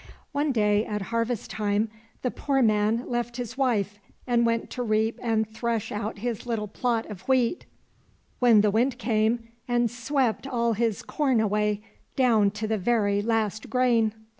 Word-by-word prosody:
One 290 Hz, +1 st, 0 dB
day, 210 Hz, -3 st, +2 dB
at 210 Hz, -2 st, -3 dB
harvest 230 Hz, 0 st, -1 dB
time, 210 Hz, +1 st, 0 dB, 0.3 s
the 250 Hz, -, 0 dB
poor 270 Hz, -2 st, +1 dB
man 215 Hz, +2 st, +2 dB
left 240 Hz, 0 st, -2 dB
his 245 Hz, 0 st, -5 dB
wife 210 Hz, -7 st, 0 dB, 0.3 s
and 235 Hz, -1 st, +2 dB
went 230 Hz, 0 st, -1 dB
to 250 Hz, -, -4 dB
reap 220 Hz, -1 st, 0 dB
and 220 Hz, -2 st, +1 dB
thresh 225 Hz, 0 st, -2 dB
out 210 Hz, +1 st, -3 dB
his 235 Hz, +2 st, -4 dB
little 220 Hz, -3 st, -2 dB
plot 230 Hz, +2 st, -1 dB
of 200 Hz, -4 st, -9 dB
wheat, 260 Hz, +4 st, +1 dB, 0.7 s
but 230 Hz, -4 st, +6 dB
the 210 Hz, -, +3 dB
Wind 240 Hz, +4 st, +1 dB
came 230 Hz, -1 st, 0 dB, 0.2 s
and 240 Hz, -1 st, +1 dB
swept 250 Hz, 0 st, -1 dB
all 235 Hz, -3 st, +1 dB
his 225 Hz, -1 st, -1 dB
corn 270 Hz, -6 st, +1 dB
away 210 Hz, -1 st, +1 dB, 0.3 s
down 225 Hz, -6 st, +4 dB
to 210 Hz, +2 st, -4 dB
the 220 Hz, -1 st, 0 dB
very 205 Hz, -1 st, +2 dB
last 220 Hz, -1 st, -1 dB
grain. 235 Hz, -4 st, +2 dB
230 Hz, 165 wpm, -26 LUFS, 215-245 Hz, 0.7 s, but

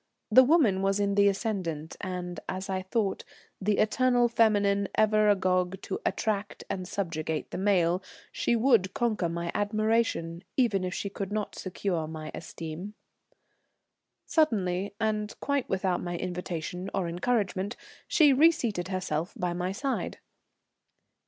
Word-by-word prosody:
The 260 Hz, +4 st, +9 dB
woman 250 Hz, -, +4 dB
was 195 Hz, +1 st, +1 dB
in 200 Hz, 0 st, +1 dB
the 200 Hz, 0 st, +5 dB
ascendant, 190 Hz, -7 st, -2 dB
and, 180 Hz, -2 st, -4 dB
as 190 Hz, +1 st, -3 dB
I 190 Hz, 0 st, -1 dB
thought, 195 Hz, +1 st, -1 dB, 0.4 s
the 205 Hz, +1 st, +1 dB
eternal 245 Hz, +2 st, +3 dB
feminine 205 Hz, -4 st, +3 dB
ever 215 Hz, -1 st, +4 dB
agog 185 Hz, -1 st, +1 dB
to -, -, -4 dB
attract 210 Hz, -3 st, -2 dB
and 185 Hz, -1 st, -4 dB
subjugate 160 Hz, -5 st, -3 dB
the -, -, -4 dB
male, 185 Hz, -3 st, +2 dB, 0.3 s
she 235 Hz, -, +1 dB
would 225 Hz, -6 st, +3 dB
conquer 215 Hz, -7 st, 0 dB
my 170 Hz, 0 st, -3 dB
admiration 210 Hz, -5 st, 0 dB
even 220 Hz, -8 st, +2 dB
if 185 Hz, +1 st, -3 dB
she 200 Hz, -, -3 dB
could 200 Hz, -1 st, -5 dB
not 210 Hz, 0 st, -2 dB
secure 180 Hz, -3 st, -3 dB
my 155 Hz, -1 st, -7 dB
esteem. 170 Hz, +5 st, -7 dB, 1.3 s
Suddenly, 200 Hz, -, +1 dB
and 215 Hz, -1 st, -1 dB
quite 280 Hz, -2 st, -1 dB
without 190 Hz, -1 st, 0 dB
my 175 Hz, -1 st, -3 dB
invitation 180 Hz, 0 st, -4 dB
or 190 Hz, -3 st, 0 dB
encouragement, 195 Hz, +2 st, -1 dB, 0.3 s
she 295 Hz, -4 st, +5 dB
reseated 255 Hz, -, +3 dB
herself 185 Hz, -2 st, -2 dB
by 180 Hz, -1 st, -1 dB
my 180 Hz, +1 st, -2 dB
side. 265 Hz, +6 st, -2 dB
195 Hz, 135 wpm, -28 LUFS, 180-215 Hz, 1.3 s, The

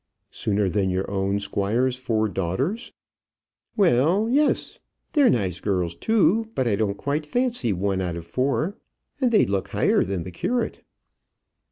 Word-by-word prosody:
"Sooner 100 Hz, -1 st, 0 dB
than 95 Hz, +1 st, 0 dB
your 95 Hz, +1 st, -1 dB
own 100 Hz, 0 st, 0 dB
squire's 105 Hz, +6 st, 0 dB
four 115 Hz, -4 st, 0 dB
daughters?" 115 Hz, -, -2 dB, 0.9 s
"Well, 180 Hz, -, +3 dB
yes. 290 Hz, +2 st, +1 dB, 0.3 s
They're 290 Hz, -4 st, +5 dB
nice 95 Hz, -6 st, 0 dB
girls 90 Hz, -4 st, -1 dB
too. 220 Hz, -, +2 dB
But 130 Hz, -, 0 dB
I 105 Hz, -, +2 dB
don't 100 Hz, -1 st, -1 dB
quite 145 Hz, +2 st, -2 dB
fancy 240 Hz, -, 0 dB
one 95 Hz, 0 st, -1 dB
out 90 Hz, -2 st, -2 dB
of 85 Hz, -1 st, -7 dB
four. 140 Hz, -, -1 dB, 0.4 s
And 255 Hz, -3 st, +3 dB
they'd 220 Hz, -, +4 dB
look 95 Hz, -1 st, -1 dB
higher -, -, +2 dB
than 95 Hz, -2 st, -3 dB
the 90 Hz, -, -8 dB
curate." 240 Hz, -, -2 dB
110 Hz, 150 wpm, -24 LUFS, -, 0.9 s, They're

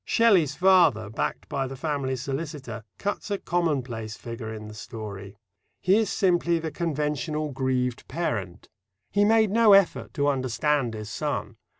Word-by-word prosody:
Shelley's 190 Hz, -, +3 dB
father, 170 Hz, -, +4 dB
backed -, -, -3 dB
by 135 Hz, -1 st, -2 dB
the 135 Hz, -, -7 dB
family 135 Hz, -2 st, -2 dB
solicitor, 135 Hz, -3 st, -5 dB
cuts 205 Hz, +2 st, -3 dB
a 200 Hz, -, 0 dB
commonplace 130 Hz, -, -2 dB
figure 115 Hz, -1 st, -6 dB
in 110 Hz, -1 st, -7 dB
the 105 Hz, -, -9 dB
story. 105 Hz, -3 st, -8 dB, 0.4 s
He 185 Hz, +2 st, +3 dB
is 220 Hz, -3 st, +1 dB
simply 175 Hz, -3 st, +2 dB
the 160 Hz, -1 st, -4 dB
conventional 150 Hz, -1 st, -2 dB
grieved 130 Hz, -2 st, -1 dB
parent. 105 Hz, -, -3 dB, 0.4 s
He 205 Hz, -, +3 dB
made 220 Hz, -1 st, +4 dB
no 225 Hz, -1 st, +6 dB
effort 195 Hz, -2 st, +3 dB
to 145 Hz, 0 st, +1 dB
understand 135 Hz, -1 st, 0 dB
his 110 Hz, -1 st, -7 dB
son. -, -, -3 dB
140 Hz, 150 wpm, -26 LUFS, 115-170 Hz, 0.4 s, no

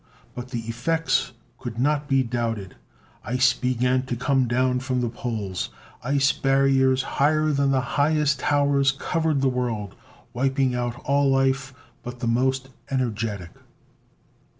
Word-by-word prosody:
But 125 Hz, +1 st, -7 dB
the 120 Hz, -3 st, -3 dB
effects 120 Hz, +9 st, 0 dB, 0.3 s
could 115 Hz, -2 st, -6 dB
not 145 Hz, +3 st, +1 dB
be 135 Hz, -1 st, +3 dB
doubted. 115 Hz, -5 st, -3 dB, 0.5 s
Ice 130 Hz, +1 st, +3 dB
began 125 Hz, 0 st, +1 dB
to 120 Hz, -, -2 dB
come 130 Hz, +1 st, +1 dB
down 125 Hz, +1 st, +1 dB
from 130 Hz, 0 st, -2 dB
the 120 Hz, -1 st, 0 dB
poles. 110 Hz, -6 st, -4 dB, 0.3 s
Ice 140 Hz, +2 st, +2 dB
barriers 135 Hz, -1 st, +2 dB
higher 155 Hz, +3 st, +1 dB
than 140 Hz, -1 st, +1 dB
the 135 Hz, -1 st, +2 dB, 0.2 s
highest 150 Hz, -2 st, +2 dB
towers 140 Hz, -1 st, +2 dB
covered 155 Hz, +1 st, -1 dB
the 135 Hz, -, +3 dB
world, 120 Hz, -6 st, -2 dB, 0.4 s
wiping 135 Hz, 0 st, +1 dB
out 120 Hz, -1 st, -2 dB
all 140 Hz, 0 st, +3 dB
life 135 Hz, 0 st, +1 dB, 0.3 s
but 125 Hz, 0 st, -8 dB
the -, -, -3 dB
most 130 Hz, +3 st, 0 dB, 0.2 s
energetic. 110 Hz, -8 st, -2 dB
130 Hz, 135 wpm, -24 LUFS, 120-140 Hz, 0.5 s, be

